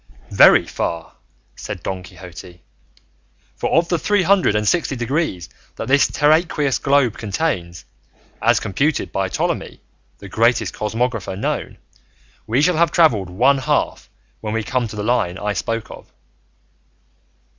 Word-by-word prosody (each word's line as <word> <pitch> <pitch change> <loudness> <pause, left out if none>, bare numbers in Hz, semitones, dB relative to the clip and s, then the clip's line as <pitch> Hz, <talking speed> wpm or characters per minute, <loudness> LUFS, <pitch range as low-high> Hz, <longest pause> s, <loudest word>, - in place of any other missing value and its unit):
"Very - - +6
far," 85 -1 -4 0.4
said - - -7
Don 95 -1 -4
Quixote, 90 -1 -12 0.9
"for - - -2
of 170 +1 +3
the 175 -2 0
three 205 +3 +1
hundred 185 - +3
and 105 0 0
sixty 165 -2 +1
degrees 120 - -2 0.3
that - - -6
this 140 +2 +4
terraqueous 150 -2 +1
globe 140 -5 +2
contains, 95 - -3 0.6
as - - +3
computed 145 - -1
by 95 -1 -1
Ptolemy, - - -3 0.4
the 100 - -11
greatest 115 0 +1
cosmographer 115 -2 -2
known, 105 - -3 0.7
we 125 +6 +1
shall 180 0 +2
have 170 0 +3
travelled 115 - +3
one 130 +10 +3
half 145 +2 -1 0.3
when 110 0 -4
we 115 - -1
come 125 +1 -1
to 110 - -9
the 105 - -4
line 105 -6 0
I 105 +1 -2
spoke 115 +1 -3
of." - - -13
115 Hz, 140 wpm, -20 LUFS, 100-145 Hz, 0.9 s, Very